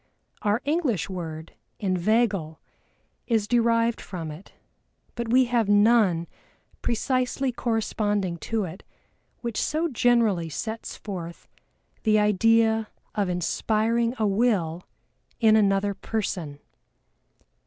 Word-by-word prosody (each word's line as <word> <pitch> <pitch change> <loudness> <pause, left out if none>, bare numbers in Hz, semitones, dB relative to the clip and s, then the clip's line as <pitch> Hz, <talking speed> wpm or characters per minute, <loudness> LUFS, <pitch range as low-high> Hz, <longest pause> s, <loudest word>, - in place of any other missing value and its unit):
Our 210 +3 +1
English 265 - 0
word, 160 -3 -6 0.2
Inveigle, 190 -3 0 0.7
is 220 -4 +1
derived 230 0 +2
from 165 -4 -6
it, 160 +7 -12 0.6
but 235 -1 -4
we 255 +2 +5
have 235 -4 +1
none 205 -5 +4 0.6
precisely 255 +2 0
corresponding 210 -6 -1
to 220 +5 -2
it 180 +1 -7 0.6
which 235 -3 -2
so 320 +2 0
generally 230 - +2
sets 220 +9 -5
forth 175 -5 -7 0.5
the 215 -1 +3
idea 220 +2 +3 0.3
of 205 -3 0
inspiring 220 +6 0
a 220 - +1
will 195 -6 0 0.5
in 220 -2 +5
another 200 -1 +2
person. 185 -9 -4
215 Hz, 100 wpm, -25 LUFS, 185-235 Hz, 0.7 s, we